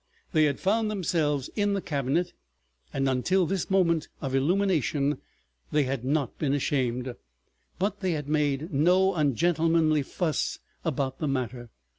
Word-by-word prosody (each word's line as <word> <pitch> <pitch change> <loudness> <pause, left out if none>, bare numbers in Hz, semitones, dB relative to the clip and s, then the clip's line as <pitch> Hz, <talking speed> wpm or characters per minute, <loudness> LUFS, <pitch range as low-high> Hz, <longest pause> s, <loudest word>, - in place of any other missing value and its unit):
They 155 -2 +5
had 140 -2 0
found 215 +3 +1
themselves 155 -8 0
in 205 -1 +1
the - - 0
cabinet, 150 +4 -1 0.6
and 135 0 0
until 175 +9 +2
this 190 +2 -2
moment 170 -5 +2
of 135 -2 -4
illumination 150 -2 +1 0.5
they 150 -1 +3
had 130 -2 -2
not 140 0 -1
been 145 -2 +1
ashamed; 125 -3 -1 0.6
but 200 +4 -1
they 185 -3 0
had 150 -3 -4
made 150 +1 0
no 180 +7 +4
ungentlemanly 160 +1 +2
fuss 155 +3 -1 0.3
about 135 -4 -2
the 155 - -1
matter. 125 -3 -3
150 Hz, 140 wpm, -27 LUFS, 135-175 Hz, 0.6 s, They